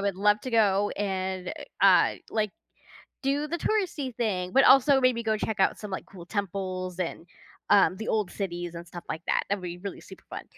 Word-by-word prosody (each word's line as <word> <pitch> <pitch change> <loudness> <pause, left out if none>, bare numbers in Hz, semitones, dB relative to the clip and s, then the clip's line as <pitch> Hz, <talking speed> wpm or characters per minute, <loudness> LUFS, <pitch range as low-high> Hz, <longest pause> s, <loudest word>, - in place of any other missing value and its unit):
would 200 -1 0
love 210 +2 +3
to 255 - -5
go 205 -3 +3
and, 190 -2 -2 0.3
uh, - - +6 0.2
like, 215 -2 0 0.7
do 280 +2 0
the 340 +3 -2
touristy 340 - -1
thing, 185 -6 -1
but 270 +7 +5
also 270 +1 +6
maybe 255 -2 +2
go 220 -1 +1
check 215 -1 -3
out 190 - +2
some, 210 - -7
like, 190 - -5
cool 180 -3 -12
temples 185 -2 -3
and, 170 -1 -3 0.4
um, 195 -2 +5
the 220 - -6
old 210 -4 +1
cities 175 -3 -4
and 170 0 -7
stuff 175 0 -9
like 160 - -3
that. - - +2
That'd 200 -2 -1
be 175 0 -5
really 200 +2 -7
super - - -13
fun. - - -6
200 Hz, 200 wpm, -27 LUFS, 185-230 Hz, 0.7 s, uh